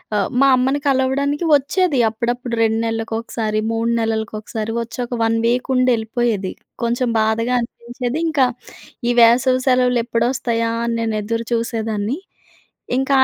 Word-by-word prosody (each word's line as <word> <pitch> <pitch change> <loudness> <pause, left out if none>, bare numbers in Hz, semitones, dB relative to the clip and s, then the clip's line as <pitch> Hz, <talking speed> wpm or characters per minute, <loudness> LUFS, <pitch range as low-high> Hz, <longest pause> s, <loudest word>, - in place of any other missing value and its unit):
ఆహ్, 200 - +1
మా 275 - +6
అమ్మని 265 +3 +1
కలవడానికి 280 +4 +1
వచ్చేది, 290 +1 +1
అప్పుడప్పుడు 240 +2 -3
2 225 0 +1
నెలలకు 225 0 -3
ఒకసారి, 215 -2 -2
3 230 +1 0
నెలలకు 225 -1 -1
ఒకసారి 220 +1 -4
వచ్చి 230 - -7
ఒక 240 - -7
1 225 0 +2
వీక్ 245 +3 +1
ఉండి 255 0 +3
వెళ్ళిపోయేది. 220 -3 -1 0.3
కొంచెం 240 +1 0
బాధగా 220 +3 +1
అనిపించేది. 240 +3 -4
ఇంకా 290 -5 +3 0.6
ఈ - - +4
వేసవి 255 +2 +5
సెలవులు 250 -1 +3
ఎప్పుడొస్తాయా! 230 -1 0
అని 235 0 -1
నేను 225 -1 -1
ఎదురు 230 +2 -3
చూసేదాన్ని. 225 +1 -1 0.8
ఇంకా 270 +1 +1
235 Hz, 140 wpm, -19 LUFS, 225-255 Hz, 0.8 s, మా